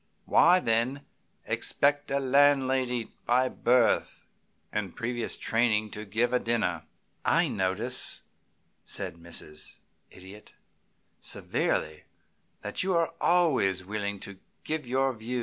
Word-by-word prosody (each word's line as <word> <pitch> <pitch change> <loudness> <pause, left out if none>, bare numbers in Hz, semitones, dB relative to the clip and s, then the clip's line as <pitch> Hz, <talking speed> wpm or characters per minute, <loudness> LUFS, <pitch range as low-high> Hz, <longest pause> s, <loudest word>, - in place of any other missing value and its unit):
Why, 180 +1 +5
then, 125 +1 0 0.4
expect 145 0 +1
a 140 - +1
landlady, 130 -3 +2 0.2
by 125 +2 +3
birth 120 -2 +2 0.5
and - - -3
previous 120 0 -2
training, 110 -2 +1
to 105 +1 -6
give 115 +5 0
a 125 - +4
dinner?" 115 -2 -1 0.4
"I - - +3
notice," 105 +7 -1 0.6
said - - -4
Mrs. 80 -2 -8 0.3
Idiot, 95 +3 -13 0.6
severely, 75 0 -2 0.6
"that - - -3
you 185 -1 +1
are 165 -1 +1
always 135 - +2
willing 100 0 -3
to 100 -2 -9 0.2
give 155 -4 -3
your 130 +1 +1
views!" 120 +2 -4
120 Hz, 115 wpm, -28 LUFS, 105-135 Hz, 0.6 s, Why